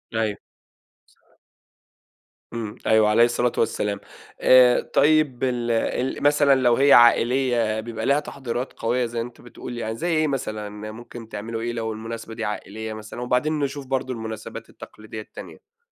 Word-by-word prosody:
أيوه. 110 -2 0 2.2
امم، 110 -3 -5
أيوه- 110 -1 +5
عليه 110 +2 +5
الصلاة 120 0 +1
والسلام- 105 -2 0 0.4
آآ، 125 -1 +6
طيب 150 -3 +3
ال 120 -2 0
ال 125 +4 -1
مثلًا 145 -1 +5
لو 120 -2 +4
هي 140 +2 +5
عائلية 120 -2 +4
بيبقى 115 0 -5
ليها 140 +1 +3
تحضيرات 130 -3 -5
قوية 120 +2 0
زي 115 0 -3
أنت 120 +1 -8
بتقول 120 0 -9
يعني 110 -1 -3
زي 165 +9 -3
إيه 155 0 +2
مثلًا، 110 -7 -3 0.2
ممكن 115 0 -10
تعملوا 115 +2 -5
إيه 120 +1 -2
لو 110 -1 -3
المناسبة 115 +1 -7
دي - - -4
عائلية 110 +1 -5
مثلًا؟ 110 +2 -8
وبعدين 125 +5 0
نشوف 140 -1 -3
برضو 130 -1 -1
المناسبات 110 -2 -7
التقليدية 110 0 -10
التانية. 465 - -13
120 Hz, 145 wpm, -23 LUFS, 110-130 Hz, 2.2 s, آآ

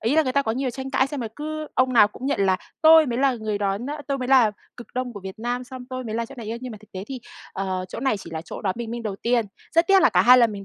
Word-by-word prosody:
ý 235 +8 +1
là 315 - +6
người 255 -3 -2
ta 280 +1 +2
có 220 - -1
nhiều 260 +1 -1
tranh 265 +2 -6
cãi 265 -1 +2
xem 275 -1 -5
rồi 225 - -3
cứ 310 +1 -4
ông 255 0 +2
nào 210 -3 +6
cũng 255 +5 -7
nhận 280 -8 0
là 190 -1 +3 0.3
"Tôi 320 -1 +8
mới 240 -1 -2
là 270 -1 +3
người 215 -2 -3
đón 200 +3 -1
á 290 +1 -5
tôi 275 - 0
mới 255 -1 -4
là 255 -5 +6 0.3
cực 240 - -10
Đông 255 -1 -2
của 205 - -8
Việt 190 +3 -8
Nam 245 +2 -2
xong 255 0 -9
tôi 255 0 -4
mới 220 -2 -4
là 230 0 -1
chỗ 275 - -12
này" 230 -4 -8
ê, 230 +1 -4
nhưng 255 -2 -6
mà 210 - -9
thực 215 - -20
tế 190 0 -6
thì, 265 -2 -6 0.3
ờ, 190 -1 -2
chỗ - - -7
này 265 -4 +1
chỉ 190 - -10
là 160 0 -5
chỗ - - -8
đón 190 -2 0
bình 230 -1 -4
minh 235 0 -4
đầu 205 -3 -4
tiên. 235 0 +1 0.3
Rất 335 +1 +4
tiếc 390 0 +5
là - - +7
cả 180 0 +4
2 250 +4 +8
lần 230 -3 +4
mình 200 -1 -7
240 Hz, 340 wpm, -24 LUFS, 215-265 Hz, 0.3 s, Tôi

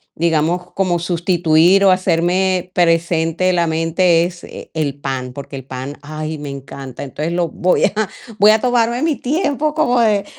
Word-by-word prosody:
digamos, 170 +2 0
como 185 -3 0
sustituir 175 +1 +2
o 190 - +6
hacerme 185 0 +1
presente 170 +1 +1
la 170 -1 +1
mente 165 +1 +2
es 175 0 -6
e - - -11
el 145 -3 -2
pan, 130 -2 -4
porque 140 0 -8
el 135 - -6
el 130 - -33
pan, 130 +3 -6
ay, 155 +1 -6
me 145 -1 -6
encanta, 135 -1 -8
entonces 150 +4 -4
lo 175 -1 0
voy 180 +3 +1
a - - 0 0.5
voy 210 +1 +7
a 220 - +3
tomarme 240 +1 +1
mi 315 -4 +1
tiempo 300 +1 -1
como 250 -6 +2
de 210 -3 +2
170 Hz, 175 wpm, -18 LUFS, 155-190 Hz, 0.5 s, voy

